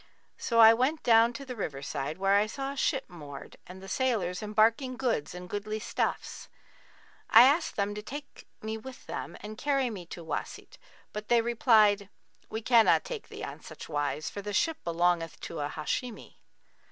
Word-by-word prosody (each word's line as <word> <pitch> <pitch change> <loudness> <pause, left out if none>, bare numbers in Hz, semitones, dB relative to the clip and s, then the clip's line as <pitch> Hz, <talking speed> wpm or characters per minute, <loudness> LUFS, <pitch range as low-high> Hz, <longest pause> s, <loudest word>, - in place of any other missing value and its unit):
So 230 -1 0
I 225 0 +10
went 260 +7 0
down 230 0 +5
to 275 +4 -8
the 255 -2 -6
river 145 -10 -4
side, 140 +2 -4
where 195 +1 +2
I 205 +1 +3
saw 270 +4 -4
a - - -7
ship 270 0 0
moored 145 -6 -10
and 185 +1 -11
the - - -9
sailors 200 -5 -1
embarking 225 +5 +2
goods 230 - -1
and 180 0 -8
goodly 205 +2 -4
stuffs. 215 - -3 0.8
I 230 - +9
asked 290 +6 +3
them 200 0 -1
to 210 - -6
take 285 +6 -9 0.2
me 220 0 -4
with 260 +3 -11
them - - -6
and 215 +1 -8
carry 275 -4 +1
me 185 -5 -8
to 170 -1 -9
Wбsit; - - -6 0.4
but 210 0 -6
they 240 -1 +4
replied, 220 -4 +3 0.4
'We 220 +1 -5
cannot 230 -1 +5
take 480 -4 -6
thee - - -8
on - - -7
such - - -10
wise, 150 0 -2
for 200 - -5
the 205 +1 -5
ship 325 - +1
belongeth 170 -1 0
to 165 - -6
a 145 0 -2
Hashimi.' 215 +11 -5
215 Hz, 185 wpm, -29 LUFS, 180-245 Hz, 0.8 s, I